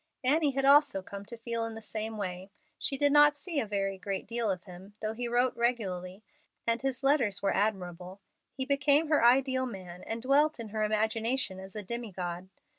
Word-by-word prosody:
Annie 295 +4 +3
had 270 0 0
also 280 -9 +5
come 200 +1 -8
to 235 - -9
feel 230 0 -2
in 225 0 -4
the - - -6
same 220 0 -4
way. 185 -1 -5 0.3
She 275 - -1
did 285 +1 +3
not 295 0 +7
see 325 -1 -2
a 225 - -2
very 195 -1 -2
great 195 0 -4
deal 230 -2 -2
of 185 -2 -2
him, 190 +3 -13
though 215 0 -2
he 240 +2 -3
wrote 245 +1 +1
regularly, 200 -5 -2 0.4
and 230 0 0
his 270 0 -2
letters 250 -9 +2
were 195 - +2
admirable. 185 -2 -2 0.3
He 265 - -4
became 285 +2 +3
her 300 -6 +3
ideal 260 +1 +4
man 180 -5 -9
and 225 - -3
dwelt 290 +2 +3
in 225 -2 -6
her 215 +1 -3
imagination 220 0 0
as 190 +1 -11
a 210 - -4
demi 235 +2 -5
god. 180 0 -5
225 Hz, 200 wpm, -30 LUFS, 195-260 Hz, 0.4 s, not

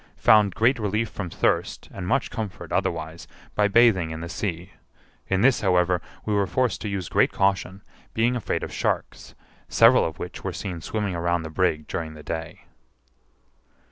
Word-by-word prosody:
Found 105 -4 +5
great 120 +3 +3
relief 105 +1 -1
from 90 -4 -5
thirst, - - -1
and 95 -2 -5
much 125 - 0
comfort 110 -5 -6
otherwise, 80 +1 -2 0.3
by 105 -1 +3
bathing 105 -6 +4
in 80 0 -5
the 85 +1 -6
sea; 90 0 -4 0.6
in 95 0 +1
this, 130 +2 +4
however, 90 -2 +2 0.2
we 105 - -1
were 100 -1 +2
forced 125 -5 0
to 105 - -3
use 95 -3 -3
great - - +2
caution, 95 0 0 0.3
being 120 +2 +2
afraid 120 - -2
of - - -6
sharks, - - -3 0.3
several 115 +3 +6
of 80 - -3
which 90 - -7
were 95 - -3
seen 90 -2 -5
swimming 105 +2 -2
around 85 0 0
the 80 - -7
brig 80 -3 0
during 80 -2 -4
the 75 - -11
day. 80 +1 -5
95 Hz, 170 wpm, -24 LUFS, 85-105 Hz, 0.6 s, several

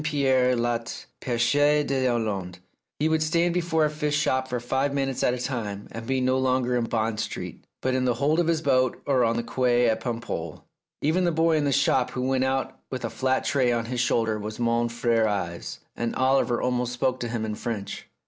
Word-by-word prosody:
Pierre 130 -4 +2
Loti's 120 0 -2
"Pecheur 145 +5 +2
dTslande." 115 -9 -1 0.4
He 150 - +1
would 160 0 +1
stand 170 +2 +2
before 165 -3 +1
a - - +1
fish 150 -1 -1
shop 130 -3 +1
for 125 -1 -2
five 135 +4 -1
minutes 135 -2 -1
at 125 - +2
a - - -5
time, 110 -6 -4
and 115 0 -7
be 130 0 +1
no 130 +1 +2
longer 130 -1 +1
in 120 -1 +1
Bond 110 -1 -1
Street, - - -5 0.2
but 130 - +1
in 130 0 +1
the 125 -2 +2
hold 145 +6 +1
of 170 - +2
his 165 -1 +1
boat 130 -3 +2
or 130 -3 +3
on 115 0 +2
the 120 - -1
quay 125 -1 +2
at 110 - +1
Paimpol. 115 -10 -4 0.4
Even 160 +5 +2
the 175 - +2
boy 165 0 +2
in 150 -2 +1
the 140 - +1
shop 130 -2 +2
who 125 0 -3
went 130 0 +1
out 135 0 -1
with 130 -2 -4
a 115 - -4
flat 130 +3 0
tray 130 -3 +2
on 115 -1 0
his 125 +1 -3
shoulder 115 -3 +1
was 105 +1 -6
mon 120 0 +1
fiere 115 -1 +1
Yves, 90 -5 -4
and 115 -1 -2
Oliver 130 -2 +2
almost 125 -1 -1
spoke 130 +1 0
to 120 - -3
him 115 -1 -2
in 110 - -3
French. 105 -3 -5
125 Hz, 215 wpm, -25 LUFS, 115-135 Hz, 0.4 s, or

